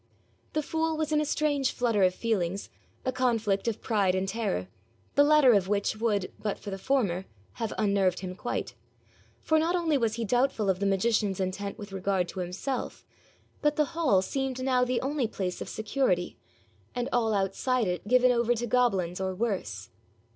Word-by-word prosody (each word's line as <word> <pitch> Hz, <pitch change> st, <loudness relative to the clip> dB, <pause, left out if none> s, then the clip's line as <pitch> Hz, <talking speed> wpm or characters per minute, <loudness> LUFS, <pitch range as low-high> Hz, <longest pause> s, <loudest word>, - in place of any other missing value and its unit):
The 305 Hz, -, 0 dB
fool 320 Hz, +1 st, -1 dB
was 310 Hz, -1 st, -1 dB
in 300 Hz, 0 st, +3 dB
a -, -, 0 dB
strange 290 Hz, -3 st, +1 dB
flutter 230 Hz, -5 st, +1 dB
of 185 Hz, -1 st, +4 dB
feelings, 195 Hz, -4 st, -1 dB, 0.3 s
a 255 Hz, -, +1 dB
conflict 230 Hz, -6 st, 0 dB
of 230 Hz, -2 st, -1 dB
pride 200 Hz, -5 st, +2 dB
and 190 Hz, +1 st, -1 dB
terror, 195 Hz, -, -2 dB, 0.5 s
the 285 Hz, -, +6 dB
latter 290 Hz, -4 st, +6 dB
of 195 Hz, -3 st, +2 dB
which 205 Hz, +1 st, 0 dB
would, 210 Hz, -4 st, 0 dB
but 210 Hz, -, -2 dB
for 205 Hz, -, -8 dB
the 195 Hz, -, -5 dB
former, 195 Hz, -7 st, 0 dB, 0.4 s
have 225 Hz, -, -1 dB
unnerved 200 Hz, -3 st, +2 dB
him 185 Hz, -1 st, -5 dB
quite; 185 Hz, -, -4 dB, 0.7 s
for 315 Hz, 0 st, +3 dB
not 335 Hz, +3 st, +1 dB
only 325 Hz, -5 st, +1 dB
was 225 Hz, -2 st, 0 dB
he 230 Hz, -1 st, -2 dB
doubtful 245 Hz, -3 st, +2 dB
of 185 Hz, -, -4 dB
the 200 Hz, -, +1 dB
magician's 200 Hz, 0 st, +1 dB
intent 195 Hz, +2 st, -3 dB
with 205 Hz, -1 st, -9 dB
regard 190 Hz, -1 st, 0 dB
to 190 Hz, -, -6 dB
himself, 185 Hz, +9 st, -4 dB, 0.6 s
but 295 Hz, 0 st, +2 dB
the 300 Hz, -, +3 dB
hall 280 Hz, -, +3 dB
seemed 265 Hz, +3 st, -2 dB
now 255 Hz, -1 st, +3 dB
the 250 Hz, -1 st, 0 dB
only 270 Hz, -2 st, 0 dB
place 185 Hz, -4 st, -4 dB
of -, -, -5 dB
security, 220 Hz, -6 st, 0 dB, 0.6 s
and 245 Hz, 0 st, -1 dB
all 225 Hz, -3 st, +2 dB
outside 215 Hz, +5 st, 0 dB
it 180 Hz, +1 st, -3 dB
given 255 Hz, +2 st, +5 dB
over 240 Hz, 0 st, +2 dB
to 240 Hz, +1 st, -2 dB
goblins 195 Hz, -8 st, +1 dB
or 190 Hz, 0 st, -2 dB
worse. 180 Hz, -, -3 dB
220 Hz, 185 wpm, -28 LUFS, 195-255 Hz, 0.7 s, the